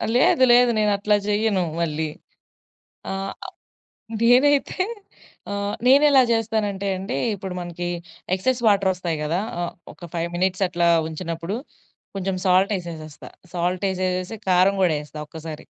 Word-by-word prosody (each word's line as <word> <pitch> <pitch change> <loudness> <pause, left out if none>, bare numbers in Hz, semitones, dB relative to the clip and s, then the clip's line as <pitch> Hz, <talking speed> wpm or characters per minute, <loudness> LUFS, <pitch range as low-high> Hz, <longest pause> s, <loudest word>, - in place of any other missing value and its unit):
లేదు 260 +1 +4
లేదు 245 0 +6
నేను 210 -1 +3
అట్ల 210 +1 +1
జెయ్యను 210 -2 +1 0.2
మళ్ళీ. 155 -1 -1 1.0
ఆహ్, 195 0 -4 0.9
నేనైతే 280 +9 +4 0.7
ఆహ్, 200 0 -2
నేనెలా 275 +1 +6
జెస్తానంటే 215 -3 0
అండి 185 -7 -4 0.2
ఇప్పుడు 190 -2 -6
మనకి 175 0 -5 0.5
ఎక్సెస్ 245 +6 0
వాటర్ 200 -2 +4
ఒస్తాయి 170 -3 -3
గదా! 165 +5 0 0.2
ఆహ్ 175 - -3 0.2
ఒక 175 - -11
5 170 0 -1
మినిట్స్ 185 +2 +1
అట్లా 175 -1 +1 0.2
ఉంచినప్పుడు 165 +4 -4 0.6
కొంచెం 190 0 -2
సాల్ట్ 185 +3 +4
ఎసెసేస్తా. 160 -4 -9 0.2
సాల్ట్ 180 +2 -1
ఎసెసేసి, 185 +2 -2
కారం 185 +2 +4
గూడా 165 -4 +3
ఎస్తా 150 0 -9
ఒక్కసారి. 160 -1 -8
185 Hz, 125 wpm, -23 LUFS, 175-210 Hz, 1.0 s, లేదు